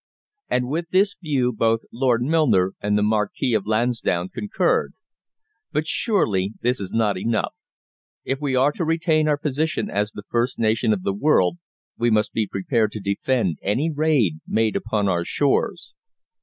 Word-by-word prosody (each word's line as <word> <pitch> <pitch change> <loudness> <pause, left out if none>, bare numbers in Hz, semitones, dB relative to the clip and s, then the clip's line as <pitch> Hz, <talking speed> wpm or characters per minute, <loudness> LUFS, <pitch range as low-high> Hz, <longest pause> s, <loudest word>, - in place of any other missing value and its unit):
And 125 0 0
with 165 +5 -3
this 195 +2 +2
view 135 -7 0
both 115 0 +1
Lord 120 -1 +1
Milner 130 - +2
and 105 0 +1
the 105 - +2
Marquis 110 +3 0
of 105 -2 0
Lansdowne 110 -5 0
concurred. 210 - 0 0.8
But 155 - -1
surely 110 - 0
this 125 +2 +1
is 100 -2 -6
not 105 -4 +1
enough. 110 +2 -1 0.7
If 135 +2 -3
we 140 -3 0
are 135 +3 +4
to 170 - -4
retain 160 -1 +1
our 150 -1 +2
position 150 +1 -2
as 105 +1 -1
the 105 - -9
first 120 +2 0
nation 110 0 +1
of 100 -4 -1
the 100 - 0
world 145 - +2 0.4
we 120 0 +2
must 110 -1 +1
be 110 -2 0
prepared 110 +2 0
to 110 - -5
defend 100 - -1
any 130 +12 0
raid 145 - +1
made 110 -1 +1
upon 105 -2 -1
our 85 -2 +1
shores. 140 +9 0
115 Hz, 165 wpm, -22 LUFS, 105-145 Hz, 0.8 s, are